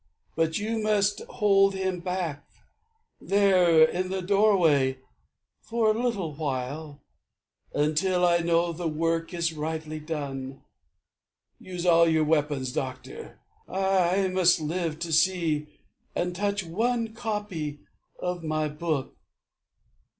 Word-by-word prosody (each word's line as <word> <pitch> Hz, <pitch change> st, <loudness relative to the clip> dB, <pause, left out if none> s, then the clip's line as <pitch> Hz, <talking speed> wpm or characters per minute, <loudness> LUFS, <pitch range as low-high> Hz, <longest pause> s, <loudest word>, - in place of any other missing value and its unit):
But 160 Hz, 0 st, +1 dB
you 220 Hz, +2 st, -2 dB
must 205 Hz, -1 st, +1 dB
hold 195 Hz, -1 st, +3 dB
him 190 Hz, -1 st, -2 dB
back, 175 Hz, -5 st, -3 dB, 0.8 s
There, 185 Hz, -5 st, +4 dB
in 180 Hz, +3 st, +1 dB
the 190 Hz, 0 st, -3 dB
doorway, 175 Hz, -10 st, +3 dB, 0.6 s
for 225 Hz, -1 st, +1 dB
a 220 Hz, +2 st, -1 dB
little 200 Hz, -11 st, -1 dB
while, 145 Hz, +1 st, -4 dB, 0.7 s
Until 180 Hz, +5 st, +1 dB
I 170 Hz, -1 st, +4 dB
know 170 Hz, 0 st, +1 dB
the 170 Hz, +1 st, -3 dB
work 165 Hz, +1 st, -1 dB
is 170 Hz, -2 st, -1 dB
rightly 155 Hz, 0 st, -4 dB
done. 140 Hz, -4 st, -5 dB, 1.0 s
Use 180 Hz, -1 st, -6 dB
all 170 Hz, -1 st, +5 dB
your 160 Hz, -1 st, +3 dB
weapons, 150 Hz, -4 st, 0 dB
doctor. 135 Hz, -, -6 dB, 0.3 s
I 190 Hz, 0 st, +2 dB
must 180 Hz, -2 st, +4 dB
live 160 Hz, 0 st, -2 dB
To 170 Hz, -1 st, -3 dB
see 160 Hz, -3 st, +2 dB, 0.5 s
and 180 Hz, 0 st, -1 dB
touch 200 Hz, +1 st, -1 dB
one 225 Hz, +6 st, -1 dB
copy 205 Hz, -10 st, -4 dB, 0.4 s
of 180 Hz, -1 st, -4 dB
my 155 Hz, -1 st, -1 dB
book. 150 Hz, -3 st, -3 dB
170 Hz, 115 wpm, -26 LUFS, 155-195 Hz, 1.0 s, all